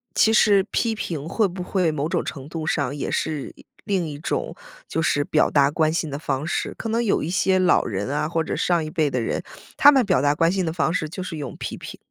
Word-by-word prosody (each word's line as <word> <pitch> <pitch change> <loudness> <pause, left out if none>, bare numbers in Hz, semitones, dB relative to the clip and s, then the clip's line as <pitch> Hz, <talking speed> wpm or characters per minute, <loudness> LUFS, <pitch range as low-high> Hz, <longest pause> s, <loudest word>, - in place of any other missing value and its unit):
其 220 - +4
实 205 -3 +5
批 230 -2 0
评 160 -8 -4
会 210 +4 +1
不 180 0 -6
会 180 -3 +1
某 155 0 -2
种 - - 0
程 140 +1 -7
度 165 -2 -5
上 140 -3 0
也 145 - -3
是， 155 -3 -2
一 - - -18 0.2
另 190 -5 0
一 145 -1 -7
种 - - -3 0.3
就 165 - -2
是 145 -2 +1
表 155 - +2
达 140 -1 +3
关 155 0 +2
心 165 -2 -1
的 140 0 -5
方 140 -2 -2
式？ 170 - -2
可 225 - -4
能 230 +2 +1
有 215 - +1
一 155 - -3
些 190 0 +2
老 185 -1 +4
人 100 -2 -3
啊， 145 +2 -1
或 165 0 -1
者 - - -3
上 175 -2 +1
一 155 - -5
辈 155 -1 +1
的 125 -2 -1
人， 115 - -2 0.3
他 290 - +8
们 265 -4 +3
表 180 -10 +2
达 145 +1 +2
关 165 +1 +3
心 190 -1 0
的 160 - -2
方 165 -1 0
式 170 -4 -1
就 180 +3 -6
是 165 -3 -6
用 140 -4 -6
批 - - -5
评。 - - -9
160 Hz, 280 characters per minute, -23 LUFS, 145-185 Hz, 0.3 s, 他